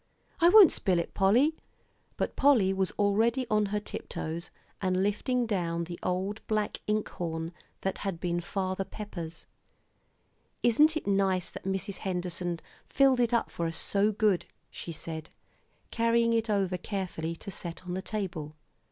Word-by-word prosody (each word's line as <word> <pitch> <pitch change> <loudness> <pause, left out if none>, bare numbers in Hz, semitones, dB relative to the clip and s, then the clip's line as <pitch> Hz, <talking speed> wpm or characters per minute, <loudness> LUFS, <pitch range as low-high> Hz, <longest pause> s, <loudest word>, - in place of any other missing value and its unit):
"I 340 0 +7
won't 400 -3 +9
spill 185 -3 +2
it, 170 - -2
Polly" 245 +11 +4 0.6
but - - -2
Polly 240 -9 +4
was 190 -1 +1
already 225 +5 +2
on 210 -1 +3
her 210 +1 -1
tiptoes, 170 -4 -5 0.3
and 185 -1 +1
lifting 240 +5 +1
down 170 -6 -1
the 170 +1 -7
old 190 +4 -2
black 215 -1 -1
ink 210 0 +1
horn 165 -1 -4 0.3
that 190 - -2
had 195 -4 -3
been 175 0 -1
Father 190 +1 -2
Pepper's. 170 -6 -7 1.2
"Isn't 300 +7 +5
it - - -5
nice 195 -2 +1
that - - -9
Mrs. 195 0 -2
Henderson 180 -2 -3 0.3
filled 270 -2 +4
it 240 -1 +3
up 235 - +1
for 170 - -2
us 165 - -4
so 205 +2 +2
good?" 205 -3 +2 0.3
she 170 - -6
said, 160 0 -6 0.6
carrying 230 0 +3
it 225 0 +1
over 190 -3 +1
carefully 175 -4 -3
to 200 - -8
set 170 -1 -5
on 180 - -4
the 190 - -2
table. 180 -8 -4
195 Hz, 155 wpm, -29 LUFS, 175-220 Hz, 1.2 s, won't